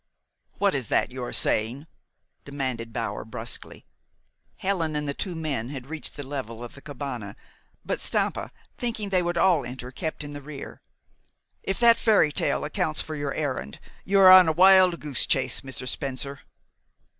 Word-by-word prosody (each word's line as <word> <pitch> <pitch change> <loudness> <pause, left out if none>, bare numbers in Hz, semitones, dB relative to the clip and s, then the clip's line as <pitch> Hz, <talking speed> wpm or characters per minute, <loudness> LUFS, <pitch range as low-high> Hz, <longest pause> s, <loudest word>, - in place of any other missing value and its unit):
"What 200 -1 +2
is 130 -5 -2
that - - +1
you 130 0 -6
are 120 - -4
saying?" 120 +7 +1 0.6
demanded 130 -5 -3
Bower 115 0 -3
bruskly. 110 +1 -4 0.7
Helen 170 -5 -1
and 150 0 -2
the 140 - -1
two 180 +3 -4
men 140 -8 -2
had 135 -3 -7
reached 155 +2 -5
the 145 - -6
level 120 -4 -5
of 120 - -8
the 140 - -12
cabane; 125 -8 -6 0.5
but - - -2
Stampa, - - -1 0.2
thinking 225 -4 -3
they 185 -2 +2
would 175 0 -2
all 170 -5 +4
enter, 125 +1 -7
kept 155 +3 -4
in 145 0 -8
the 145 - -7
rear, 140 0 -9 0.8
"If 195 - -3
that 235 -1 +7
fairy 205 -9 +4
tale - - 0
accounts 155 +1 -1
for 155 - -6
your 145 -2 -3
errand, 130 - -3 0.2
you 195 +1 +2
are 185 -1 +10
on 185 -2 +9
a 160 - +2
wild 185 0 +6
goose 145 -5 0
chase, 130 -3 +1
Mr. 130 -1 -5
Spencer." 140 +1 -3
145 Hz, 170 wpm, -26 LUFS, 130-170 Hz, 0.8 s, are